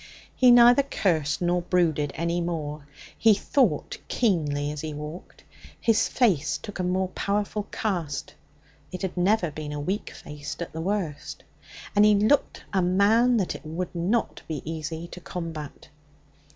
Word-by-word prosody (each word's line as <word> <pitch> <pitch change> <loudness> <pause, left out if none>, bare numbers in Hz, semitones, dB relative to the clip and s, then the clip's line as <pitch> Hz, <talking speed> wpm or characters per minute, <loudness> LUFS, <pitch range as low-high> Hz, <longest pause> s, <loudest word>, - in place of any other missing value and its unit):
He 255 - +5
neither 245 +2 +8
cursed 165 - 0
nor 175 0 +2
brooded 165 -5 +1
any 170 +1 -1
more. 155 -4 -4 0.3
He 220 -2 +5
thought 205 - 0
keenly 150 -10 0
as 150 -1 -5
he 155 -2 -5
walked. 150 +4 -9 0.4
His 225 -2 +3
face 185 - +1
took 205 -2 -9
a - - 0
more 185 +1 0
powerful 205 +2 -2
cast 170 -10 -3 0.6
it 185 +1 -6
had 190 - -3
never 180 -1 +2
been 150 0 -6
a 150 - -4
weak 190 +8 -2
face 145 -1 -8
at 170 - -6
the 160 - -4
worst 180 -5 -3 0.5
and 205 - +6
he 210 0 +6
looked 215 +8 +2
a 190 - +3
man 210 +7 +4
that 190 -5 0
it - - -10
would 170 +4 -4
not 185 +7 -1
be 155 -4 -4
easy 160 +1 -5
to 180 - -10
combat. 165 -5 -7
175 Hz, 155 wpm, -26 LUFS, 155-205 Hz, 0.6 s, neither